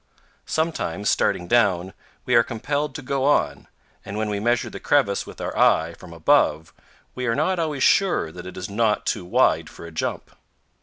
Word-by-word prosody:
Sometimes, 155 - -1
starting 90 - 0
down, 95 -5 +2 0.3
we 125 - 0
are 120 - +7
compelled 145 +6 -3
to 145 - -6
go 135 +1 -1
on, 75 - +1 0.4
and 100 - -6
when 110 -1 -1
we 100 - -2
measure 120 +2 +1
the - - -7
crevice 130 -9 +1
with - - -11
our - - -4
eye - - +3
from - - -13
above 80 -1 +2 0.4
we 125 0 -4
are 115 - +1
not 175 +5 0
always 155 -4 -1
sure 180 - +3
that 90 +2 -9
it 90 - -9
is 90 +1 -5
not 105 0 0
too - - -1
wide 90 - +2
for - - -11
a 85 - -9
jump. 80 - -4
110 Hz, 190 wpm, -23 LUFS, 90-140 Hz, 0.4 s, are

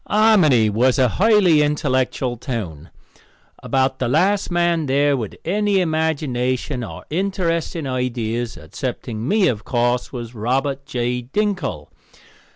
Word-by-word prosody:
Harmony 190 - +4
was 120 +5 +2
a 130 -2 +4
highly 190 - +4
intellectual 130 -4 0
town. 100 - -6 0.7
About 130 0 0
the 130 - 0
last 190 +10 +2
man 170 -3 +1
there 140 +2 +2
with 115 -6 -5
any 205 +2 +1
imagination 145 -6 -1
or - - -8
interesting 170 -3 -1
ideas, 120 -3 -2
excepting 110 +6 -5
me, 205 +1 +3
of 105 -8 -1
course, 120 +1 0
was 120 -2 -7
Robert 135 +5 -2
J. 125 -3 -2
Dinkle. 190 - -2
135 Hz, 120 wpm, -20 LUFS, 120-170 Hz, 0.7 s, Harmony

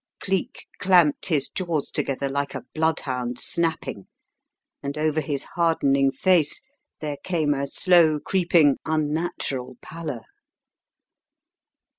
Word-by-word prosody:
'" - - -65
Cleek 190 -2 -2
clamped 180 -6 +4
his 150 -6 +2
jaws 170 -6 -3
together 140 0 -2
like 140 +1 -2
a - - -6
bloodhound 130 -6 -1
snapping 165 - -1 0.7
and 140 +1 -5
over 155 0 +1
his 140 -1 -2
hardening 140 -6 +2
face 160 - +2 0.4
there 150 -2 -3
came 155 -3 0
a 140 0 -2
slow 165 -1 +4
creeping, 170 -5 +3
unnatural 150 -4 -2
pallor. 150 -8 -6
155 Hz, 110 wpm, -24 LUFS, 140-170 Hz, 0.7 s, clamped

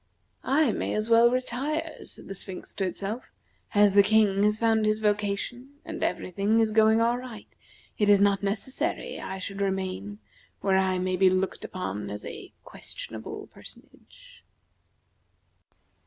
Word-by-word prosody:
"I 275 -1 +3
may - - -2
as 215 +2 -1
well 230 +1 +7
retire," 295 +6 -2
said - - -11
the 195 - -5
Sphinx 190 -1 -8
to 195 - -1
itself. 205 +6 -5 0.5
"As 205 -1 +5
the 200 - +8
King 205 -1 +3
has 210 +1 +3
found 225 -1 +2
his 215 0 +2
vocation 210 +6 -1
and 325 0 -5
every 180 0 -2
thing 205 +5 +2
is 220 -1 +2
going 220 +1 +5
all 235 +2 +2
right 245 -5 -10 0.4
it 205 -1 +3
is 205 -1 +7
not 200 -1 +3
necessary 205 +6 -3
I 190 - -5
should 195 +1 -5
remain 185 - -2 0.4
where 190 -1 +3
I 190 -1 +1
may 185 0 -1
be 190 0 +5
looked 185 +1 -1
upon 105 - -5
as 105 +1 -6
a - - -8
questionable - - -8
personage." - - -15
205 Hz, 155 wpm, -27 LUFS, 190-230 Hz, 0.5 s, the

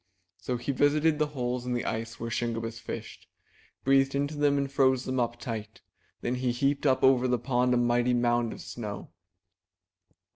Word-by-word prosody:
So 125 - -2
he 120 +4 -2
visited 150 +3 +2
the 150 - +2
holes 125 -4 -3
in 125 0 -2
the 120 - -2
ice 115 +1 -4
where 115 0 -4
Shingebiss 115 0 -2
fished, - - -8 0.6
breathed 135 0 +3
into 145 +2 -1
them 145 -1 +2
and 140 -1 -1
froze 130 -2 +3
them 130 0 -1
up 120 0 -1
tight: 110 -3 -6 0.4
then 120 - -1
he 125 0 0
heaped 140 +4 +1
up 130 -1 +2
over 130 -1 +5
the 125 0 +2
pond 125 +1 +1
a - - +3
mighty 120 +1 +2
mound 120 -1 +1
of - - -8
snow. 105 -5 -7
125 Hz, 180 wpm, -28 LUFS, 120-135 Hz, 0.6 s, over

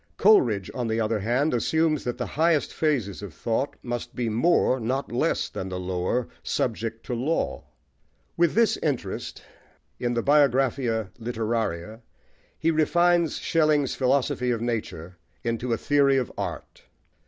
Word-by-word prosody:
Coleridge, 120 - +4
on 125 -3 -2
the 110 0 0
other 110 0 0
hand, 125 +9 +1
assumes 155 +5 +1
that 120 0 -2
the 125 - -2
highest 160 +2 +1
phases 125 - -1
of 100 -6 -8
thought 120 +5 -1
must 120 -1 -5
be 120 -2 -1
more, 130 +2 +2
not 130 +4 -2
less, 120 - 0
than 95 - -6
the 90 0 -4
lower, 90 +6 -1
subject 115 -1 -2
to - - -4
law. 135 +8 -1 0.7
With 170 -1 +2
this 230 0 +3
interest, 130 -11 -3 0.6
in 120 0 -1
the 115 - 0
Biographia 130 -7 +2
Literaria, 110 -3 -3 0.6
he 165 +1 +1
refines 170 +1 +3
Schelling's 155 -4 +2
"Philosophy 130 -1 +1
of 120 -2 0
Nature" 105 -7 -4 0.2
into 115 +1 -2
a 115 - +2
theory 140 0 +3
of 130 - -1
art. - - -6
120 Hz, 140 wpm, -25 LUFS, 115-145 Hz, 0.7 s, Coleridge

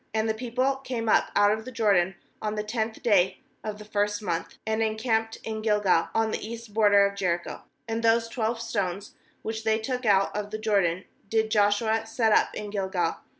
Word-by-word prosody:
19And 220 0 +1
the - - +2
people 255 +4 -1
came 250 -4 -4
up - - +3
out 205 0 +5
of 220 +1 -1
the 255 - -8
Jordan 195 -6 +2 0.3
on 215 0 -2
the 210 - -2
tenth 220 +1 -3
day 195 -5 +3 0.3
of 215 -1 -4
the 210 - -11
first 205 0 0
month, 170 -5 -3
and 220 0 0
encamped 225 0 0
in 220 -1 -4
Gilgal, 210 -6 +2
on 225 -1 +2
the - - -3
east 230 0 -8
border 205 -2 +5
of 200 0 -2
Jericho. 175 -3 -2 0.3
20And 225 0 -2
those 230 0 +3
twelve 230 0 -2
stones, 200 -4 -3 0.3
which 220 0 -4
they 220 0 +2
took 250 +3 -3
out 195 -1 +3
of 210 0 -3
the 215 - -4
Jordan, 195 -5 +1 0.2
did 220 0 +1
Joshua 220 +2 +2
set 225 -1 +1
up - - +3
in 210 -1 -5
Gilgal. 190 -4 -1
220 Hz, 195 wpm, -27 LUFS, 205-225 Hz, 0.3 s, out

